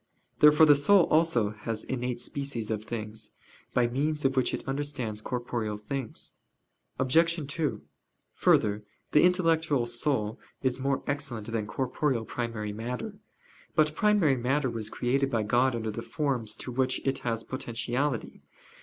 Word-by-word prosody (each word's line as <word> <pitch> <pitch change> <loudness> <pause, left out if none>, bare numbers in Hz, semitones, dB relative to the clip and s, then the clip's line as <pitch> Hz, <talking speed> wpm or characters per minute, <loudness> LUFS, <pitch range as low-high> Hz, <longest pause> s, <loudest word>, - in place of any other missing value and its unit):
Therefore 150 +1 +7
the 150 - +8
soul 175 +7 +5
also 155 -10 +3
has 110 +1 -4
innate 125 -1 -3
species 125 -5 -3
of 110 0 -3
things, 110 -1 -6 0.4
by 125 - +3
means 145 +5 -1
of 135 0 +2
which 130 -2 +2
it - - -5
understands 135 -6 -2
corporeal 120 -3 -3
things. 130 +2 -5 0.7
Obj. 165 +4 +2
2: 140 -7 -2 0.5
Further, 105 0 +2 0.3
the 150 - +6
intellectual 165 -7 +3
soul 120 -2 -1 0.2
is 130 -1 0
more 135 0 0
excellent 135 -6 -3
than 110 -2 -2
corporeal 130 +1 -1
primary 115 -4 -4
matter. 125 - -5 0.6
But 155 -1 +3
primary 190 -8 +3
matter 130 +2 0
was 110 -2 -3
created 135 +4 0
by 115 -5 0
God 125 +4 +2
under 110 -1 -2
the 115 - -5
forms 120 -2 -1
to 125 - -6
which 130 +1 +1
it 135 -1 0
has 115 -2 -2
potentiality. 125 +1 -2
125 Hz, 145 wpm, -28 LUFS, 115-145 Hz, 0.7 s, the